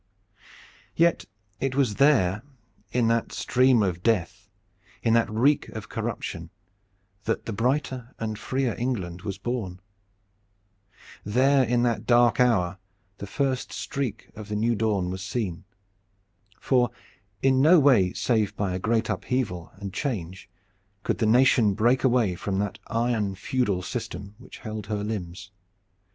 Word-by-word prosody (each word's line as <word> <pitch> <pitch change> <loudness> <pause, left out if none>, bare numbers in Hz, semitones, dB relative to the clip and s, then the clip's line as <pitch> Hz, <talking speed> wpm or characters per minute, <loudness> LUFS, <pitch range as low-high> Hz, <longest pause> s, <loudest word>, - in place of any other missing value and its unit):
Yet 170 - +3 0.3
it 135 -1 -1
was 130 -7 +1
there 105 -9 +4 0.5
in 120 -2 +2
that 115 0 0
stream 125 -3 +3
of 90 -3 -1
death, 100 -2 -1 0.5
in 115 - +3
that 115 0 +3
reek 130 +7 +2
of 110 -1 -8
corruption, 110 -7 -4 0.8
that 115 - -1
the 115 - -4
brighter 125 +2 -1
and 110 -1 -4
freer 130 -3 -1
England 95 -9 -3
was 100 -1 -5
born. 100 -4 -4 1.4
There 130 +6 +3
in 120 0 +1
that 120 -2 0
dark 120 -2 +4
hour 100 -7 +2 0.4
the 100 - -6
first 130 +3 -1
streak 135 -7 -4
of 105 -1 -9
the 105 - -2
new 115 +3 +1
dawn 100 -4 0
was 95 0 -5
seen. 95 -3 -3 0.9
For 125 -3 +2 0.5
in 130 -1 +4
no 165 +4 +7
way 120 -11 +4
save 110 -2 0
by 100 -3 -1
a 90 - -2
great 110 +2 +1
upheaval 100 -10 -2
and 100 -1 -7
change 95 - -4 0.5
could - - -1
the 110 - +2
nation 115 -3 +4
break 120 +4 +2
away 120 -7 +3
from 95 +2 -3
that 100 0 -2
iron 115 -4 0
feudal 100 -2 -1
system 100 +3 -5
which 125 - -12
held 110 -2 -5
her 105 -1 -2
limbs. 95 -3 -5
110 Hz, 140 wpm, -26 LUFS, 100-125 Hz, 1.4 s, no